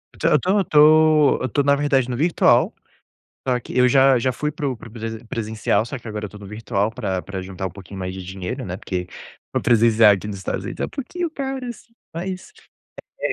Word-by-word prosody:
Então, - - +1
eu - - +5
tô 185 - 0
eu - - +2
tô 155 -2 +5
eu 130 - -1
tô 145 - +1
na 140 0 +4
verdade 140 -3 +1
no 120 - -2
virtual, 165 +4 +3 0.7
só 125 -1 +2
que - - -9
eu 125 0 +5
já 135 0 +5
já 130 +2 +1
fui 150 +4 -2
para 145 -1 -3
o 130 - -3
para 115 - -12
o - - -15
presen 115 0 -6
presencial, 110 -2 -1
só 140 - -5
que 120 - -16
agora 105 -1 -4
eu - - -10
tô 105 - -12
no 100 - -11
virtual 105 0 -2
pra 95 -6 -3
pra 95 -1 -6
juntar 95 0 -5
um - - -4
pouquinho 100 +1 -11
mais 90 0 -4
de 95 - -7
dinheiro, 95 +8 -5
né. 90 - -5
Porque 90 -3 -4 0.5
no - - 0
presencial 115 -2 +5
aqui 100 +1 -2
nos 105 -1 -5
Estados 95 - -4
Unidos - - -7
é - - +1
um - - -10
pouquinho 335 +5 -4
caro 270 -3 -4
assim 235 0 -9 0.2
mas, 185 - -6 0.7
é. - - 0
120 Hz, 240 wpm, -22 LUFS, 100-150 Hz, 0.7 s, eu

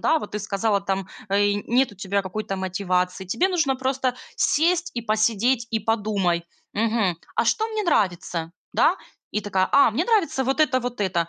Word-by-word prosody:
Да, 320 - +3
вот 210 - -8
ты - - 0
сказала, 205 0 0
там 195 -1 -2 0.2
и 205 0 +2
нет 250 0 +2
у 205 - -16
тебя 200 0 -1
какой-то 195 +1 -4
мотивации, 185 0 -1
тебе 355 - +1
нужно 315 -8 +1
просто 260 -1 -1 0.2
сесть 345 +2 +2
и 235 - -3
посидеть, 225 +2 +1
и 225 - +1
подумай: 200 -6 0 0.3
"Мгм, 215 -4 +1 0.2
а - - +2
что 440 - +1
мне 435 -1 -2
нравится?" 175 - 0 0.2
Да, - - +3 0.4
и 210 - 0
такая: 190 -2 0
"А, 280 -4 +6
мне 265 +11 0
нравится 330 - +1
вот 270 +4 0
это, 260 -4 +3
вот 245 -2 -5
это. 175 -4 0
215 Hz, 180 wpm, -24 LUFS, 195-265 Hz, 0.4 s, А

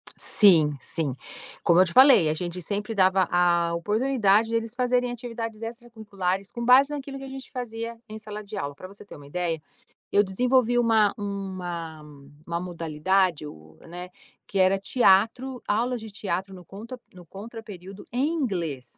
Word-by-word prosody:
Sim, 165 -8 +4
sim. 145 -4 -3 0.5
Como 170 0 +4
eu 185 - +7
te 170 - -5
falei, 255 - +7
a - - +1
gente 175 +2 -5
sempre 205 +5 -3
dava 190 -2 +3
a 170 -1 +2
oportunidade 215 +3 +2
de 230 - -1
eles 230 0 -2
fazerem 250 -1 +1
atividades 230 -2 -6
extracurriculares 215 -5 -4
com 235 - -5
base 260 +4 +6
naquilo 275 -1 -6
que 270 - -9
a - - -7
gente 265 0 -9
fazia 230 -2 -5
em 215 0 -8
sala 210 0 -8
de 205 +1 -9
aula. 145 -7 -4
Para 185 - -10
você 200 +1 -13
ter - - -12
uma 145 - -13
ideia, 165 +1 -2 0.5
eu 205 - +4
desenvolvi 245 +4 +2
uma 225 -3 +3
uma 185 -6 -5 0.5
uma 170 0 -2
modalidade 175 0 0
o 80 - -13
né, 180 +2 -9 0.4
que 200 - -4
era 190 +1 +4
teatro, 240 +4 +2
aulas 235 +3 0
de 220 - -8
teatro 195 -1 -4
no 180 -1 -13
contra 230 +7 -9
no 180 -1 -13
contraperíodo 200 -1 -10
em 255 +4 +1
inglês. 170 - -3
200 Hz, 170 wpm, -25 LUFS, 180-235 Hz, 0.5 s, eu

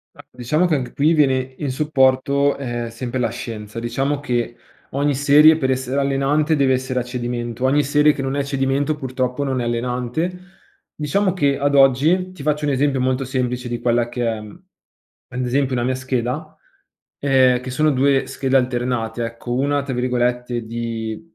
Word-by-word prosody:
Ma - - -12
diciamo 125 +8 0
che 170 -3 +2
anche 130 -3 -4
qui 150 +3 +2
viene 130 -4 +1
in 145 -3 -3
supporto, 140 0 +2
ehm, 120 -3 -4
sempre 120 +2 -5
la 125 - +1
scienza. 110 -1 -7
Diciamo 135 +4 -1
che 120 -4 -2 0.4
ogni 140 +1 +1
serie 145 +3 +6
per 130 -4 0
essere 130 +1 -1
allenante 140 +3 +1
deve 140 -2 +2
essere 130 0 0
a - - -4
cedimento. 120 -1 -4
Ogni 145 +3 +3
serie 150 +2 +3
che 140 - -5
non 135 +1 -2
è - - +1
a - - 0
cedimento 140 +2 0
purtroppo 130 -1 -2
non 135 -2 -1
è 120 - -2
allenante. 125 +9 -2 0.6
Diciamo 180 +6 0
che 140 -6 +1
ad 145 0 +1
oggi 145 +8 +4
ti 185 -6 -10
faccio 150 0 0
un 145 - +1
esempio 135 0 +1
molto 130 +1 0
semplice 125 -1 -2
di 120 -1 -4
quella 120 0 +1
che 120 0 -3
è 115 -1 -1
ad 125 - -11
esempio 130 +1 0
una 120 - 0
mia 130 +1 0
scheda, 130 +4 -3 0.6
ehm, 130 -3 +4
che 130 - -7
sono 155 +4 +2
2 135 0 +2
schede 135 -1 -2
alternate, 120 -2 -1
ecco, 115 +1 -6
una, 140 +2 +1
tra 140 -1 -4
virgolette, 125 -1 -1
“di 115 -1 -4
130 Hz, 180 wpm, -20 LUFS, 125-140 Hz, 0.6 s, serie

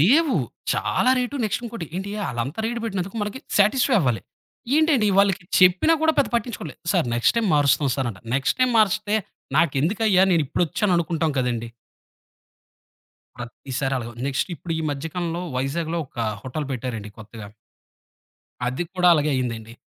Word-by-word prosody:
లేవు. 280 - +4 0.4
చాలా 255 - +1
rate 250 +3 -2
next 215 +3 -1
ఇంకోటి, 230 -8 -6
ఏంటి 195 +2 -4 0.2
ఆళ్ళంతా 130 - -3
రేటు 235 0 -3
పెట్టినందుకు 195 0 -3
మనకి 210 +5 -4 0.2
సాటిస్ఫై 245 +5 +3
అవ్వాలి. 125 - 0 0.6
ఏంటండి 305 -9 +3
వాళ్ళకి 195 -3 +3 0.2
చెప్పినా 185 - +5
కూడా 320 0 +4
పెద్ద 280 - +3
పట్టించుకోలేదు. 210 - -3
సారు, - - +2
నెక్స్ట్ 120 - +2
టైమ్ 225 -4 +2
మారుస్తాం 145 -1 +3
సారు 130 -3 -1
అంట. 95 - -12
నెక్స్ట్ 135 +1 +1
టైమ్ 255 -1 +3
మారిస్తే, 215 0 +2 0.4
నాకెందుకయ్యా 185 +7 +3
నేనిప్పుడొచ్చాను 170 - +1
అనుకుంటాం 160 -1 0
కదండీ. 120 -2 -1 1.7
ప్రతిసారి 130 +2 -4
అలాగుంది. 120 +1 -7
నెక్స్టిప్పుడు 165 +4 -3
ఈ - - -2
మధ్య 145 +3 -4
కాలంలో 175 -1 -2
వైజాగ్‌లో 160 +5 -2
ఒక 120 - -17 0.2
హోటల్ 140 +3 -4
పెట్టారండి 115 -4 -5
కొత్తగా. 110 -1 -10 1.2
అది 130 +7 -1
కూడా 180 -1 +4
అలాగే 150 -1 +1
అయిందండి. 115 -3 -3
165 Hz, 140 wpm, -23 LUFS, 130-210 Hz, 1.7 s, చెప్పినా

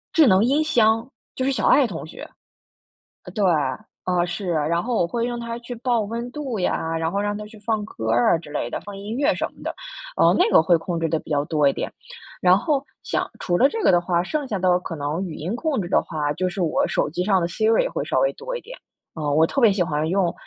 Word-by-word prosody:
智 320 - +7
能 190 +1 +5
音 290 +5 +2
箱， 225 -6 +3 0.3
就 260 - -2
是 270 - +1
小 230 -5 0
爱 285 - +6
同 165 -7 -6
学。 - - -9 1.1
对， 210 -3 0 0.6
啊， 180 -1 +1
是， 180 +2 -4
然 165 +2 0
后 240 0 -1
我 170 - +2
会 235 +4 -1
让 240 -1 -3
它 235 0 -5
去 245 +1 -7
报 240 -1 +1
温 230 +4 -4
度 265 -8 -4
呀， 165 -2 -1
然 165 0 -1
后 200 - -1
让 205 0 -1
它 210 - -6
去 215 - -14
放 215 0 -1
歌 110 - -5
儿 120 +8 +4
啊 - - 0
之 155 -3 -12
类 120 -5 -2
的， - - -4
放 205 -1 -9
音 210 +5 -5
乐 290 +2 +3
什 - - -2
么 - - -16
的， - - -3 0.5
嗯， - - +5
那 365 +5 +4
个 - - +7
会 170 +1 +4
控 170 +1 -3
制 165 -1 0
得 160 - +1
比 - - -15
较 145 -1 +2
多 150 -3 +2
一 140 - +3
点， - - -4 0.5
然 180 0 +5
后 275 +7 0 0.2
像 - - -2
除 175 -1 0
了 270 - +6
这 450 +7 -4
个 - - +5
的 175 - +5
话， 175 0 0
剩 285 - -3
下 205 -5 -2
的 180 -1 +3
可 165 - -6
能 150 +6 -2
语 165 - -7
音 180 +9 -3
控 280 -4 -1
制 175 - -5
的 - - +3
话， 150 -3 -2
就 185 +4 -1
是 185 +2 -3
我 165 -3 +1
手 - - 0
机 180 +3 -2
上 190 -2 +2
的 170 - 0
Siri 220 +5 +2
也 - - -1
会 - - -3
稍 - - +1
微 - - +2
多 - - -6
一 485 - -5
点。 - - -11 0.4
啊， 155 -2 -3
我 155 +3 +4
特 275 - -2
别 220 -5 +5
喜 190 - -1
欢 155 -1 -1
用 180 -1 +1
195 Hz, 290 characters per minute, -23 LUFS, 165-240 Hz, 1.1 s, 智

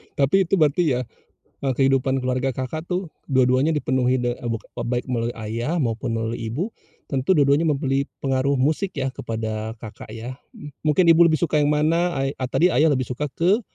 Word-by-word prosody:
Tapi 145 +8 +3
itu - - -6
berarti 155 +3 +3
ya, 125 - -1 0.6
eee, 135 - +1
kehidupan 135 0 +2
keluarga 130 +1 -1
Kakak 130 +6 -4
tuh 180 -1 -2 0.2
dua-duanya 130 +3 +3
dipenuhi 130 -3 +1
de 120 0 -1
eee, 120 - -5
buk 115 -2 -2 0.2
baik 120 +1 -2
melalui 120 -1 -1
ayah 115 +9 -2
maupun 115 -2 -2
melalui 115 +1 -2
ibu, 165 - -2 0.4
tentu, 135 +6 +1
dua-duanya 145 0 +3
memberi 140 -2 0 0.2
pengaruh 135 +1 +1
musik 160 +8 0
ya 135 -1 0
kepada 110 -1 -4
Kakak 110 -1 -10
ya, 120 +3 -7 0.2
m 150 - -9 0.2
mungkin 155 +4 +3
ibu 165 +1 +6
lebih 160 -2 +3
suka 155 -3 +1
yang 145 - +2
mana, 165 +4 +2
eee, 135 +1 -1 0.2
tadi 175 +2 +3
ayah 155 +5 +4
lebih 130 -2 -1
suka 145 +4 -2
ke, 190 +7 +2
135 Hz, 185 wpm, -23 LUFS, 125-155 Hz, 0.6 s, ibu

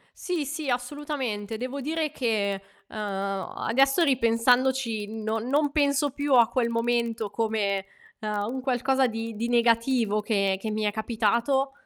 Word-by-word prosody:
Sì, 345 -5 -2
sì, 295 0 -4
assolutamente. 245 -4 -3
Devo 260 +3 -4
dire 310 +1 -1
che, 210 -8 -1 0.3
uhm, - - -10
adesso, 210 - 0
ripensandoci 245 -3 +2
no 220 0 -3
non 280 +5 +1
penso 285 -1 +2
più 285 0 +1
a 235 -2 +6
quel 240 -1 0
momento 230 -2 0
come, 210 -3 0 0.4
uhm, 210 +1 -2
un 260 - -4
qualcosa 265 +1 +2
di 225 -1 -5
di 230 +3 -2
negativo 230 -2 +2
che 195 -3 +1
che 220 - -3
mi 215 0 -2
è 210 - +1
capitato 235 +5 +1
235 Hz, 140 wpm, -26 LUFS, 215-270 Hz, 0.4 s, a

